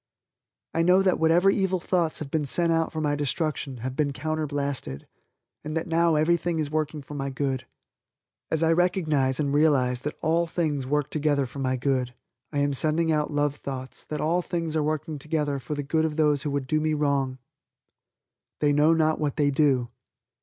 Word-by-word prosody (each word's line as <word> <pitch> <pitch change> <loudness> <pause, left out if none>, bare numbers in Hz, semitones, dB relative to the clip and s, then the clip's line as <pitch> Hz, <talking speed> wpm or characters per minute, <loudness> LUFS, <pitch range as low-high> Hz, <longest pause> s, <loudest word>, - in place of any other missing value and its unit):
I 165 - +1
know 180 +3 +5
that 185 -2 +2
whatever 170 +4 +4
evil 190 -2 0
thoughts 170 -2 0
have 140 -3 -5
been 150 -3 0
sent 170 +4 +1
out 165 0 +1
for 160 - -4
my 145 -1 +1
destruction 145 -2 -2
have 130 0 -3
been 145 -1 0
counter 155 +3 -2
blasted, 140 - -4 0.6
and 155 +1 -3
that 165 - -2
now 165 -1 +2
everything 170 +2 +1
is 150 -2 -2
working 155 -1 -2
for 150 - -10
my 140 -1 -3
good. 130 -1 -2 0.8
As 160 0 0
I 165 - +4
recognize, 155 -7 +1
and 140 -2 0
realize, 135 -5 +3
that 150 +2 -4
all 165 +1 +2
things 150 -6 -1
work 150 +1 0
together 145 -2 +1
for 135 +3 -9
my 130 -1 0
good, 125 -1 -1 0.4
I 145 - -3
am 145 0 +1
sending 160 +4 +1
out 150 -1 +1
love 145 -1 0
thoughts 130 -2 -6
that 150 - -4
all 170 +3 +1
things 165 -2 -3
are 155 - +2
working 155 0 -2
together 150 -1 -1
for 135 +4 -5
the 145 - -3
good 160 +3 +1
of 155 -1 -2
those 150 -3 +2
who 145 - -2
would 140 -1 -2
do 155 +3 0
me 155 0 +1
wrong. 140 -3 0 1.2
"They 145 -1 +3
know 150 +3 +4
not 155 -1 +2
what 150 -3 -1
they 145 -2 +2
do." 135 -4 +2
150 Hz, 195 wpm, -26 LUFS, 140-160 Hz, 1.2 s, know